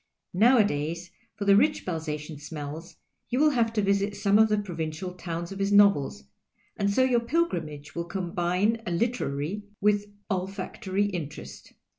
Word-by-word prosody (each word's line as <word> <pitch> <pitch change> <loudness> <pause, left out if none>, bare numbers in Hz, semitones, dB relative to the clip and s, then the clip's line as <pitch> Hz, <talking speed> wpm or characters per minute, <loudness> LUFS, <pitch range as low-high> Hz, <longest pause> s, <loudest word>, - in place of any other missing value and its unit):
Nowadays 180 - +2 0.2
for 205 - -4
the 200 0 +6
rich 300 +9 +3
Balzacian 155 -3 -4
smells 150 +2 -7 0.3
you 250 - -1
will 300 +2 +5
have 235 -4 +1
to 210 -2 +1
\'isit 200 +1 +1
some 205 0 +3
of 220 0 +6
the 210 - +2
provincial 175 -2 -4
towns 170 -1 -5
of 195 - -7
his 195 +1 0
novels, 200 - +4 0.5
and 200 - 0
so 230 +6 +3
your 250 -2 +3
pilgrimage 170 - -2
will 170 0 -3
combine 180 +4 0
a - - 0
literary 170 - -1 0.2
with 205 0 +2 0.2
all 185 -3 -1
factory 195 0 -2
interest. 150 - -6
190 Hz, 155 wpm, -27 LUFS, 165-210 Hz, 0.5 s, the